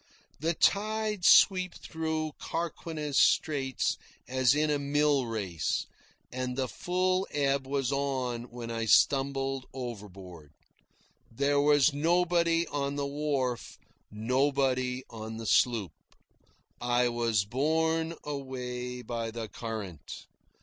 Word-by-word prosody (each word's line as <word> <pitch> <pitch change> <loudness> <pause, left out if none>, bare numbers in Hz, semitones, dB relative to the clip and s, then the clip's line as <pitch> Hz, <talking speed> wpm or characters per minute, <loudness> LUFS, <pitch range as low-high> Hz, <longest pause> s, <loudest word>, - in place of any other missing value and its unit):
The 165 +3 0
tides 215 -1 +1
sweep 185 -2 +6
through 160 -1 -3
Carquinez 160 -3 -2
Straits 135 -4 +2 0.3
as 130 +1 +3
in 150 0 +2
a 145 - +1
mill 145 -2 +2
race, 100 -8 -2 0.5
and 125 0 -3
the 130 -1 0
full 185 - 0
ebb 140 -2 0
was 135 -1 -1
on 130 -4 -1
when 120 -1 -7
I 115 0 -2
stumbled 135 +2 +2
overboard. 95 - -8 0.8
There 140 +4 +2
was 145 0 +4
nobody 170 +2 +2
on 140 -1 -2
the 145 -1 -1
wharf, 140 -4 -2 0.3
nobody 130 +2 0
on 110 0 -7
the 115 - -6
sloop. 110 -5 +2 0.9
I 120 0 +2
was 115 -4 +1
borne 160 +7 0
away 125 -3 -5
by 115 -2 -3
the 115 -1 -6
current. 100 - -7
135 Hz, 110 wpm, -29 LUFS, 120-150 Hz, 0.9 s, sweep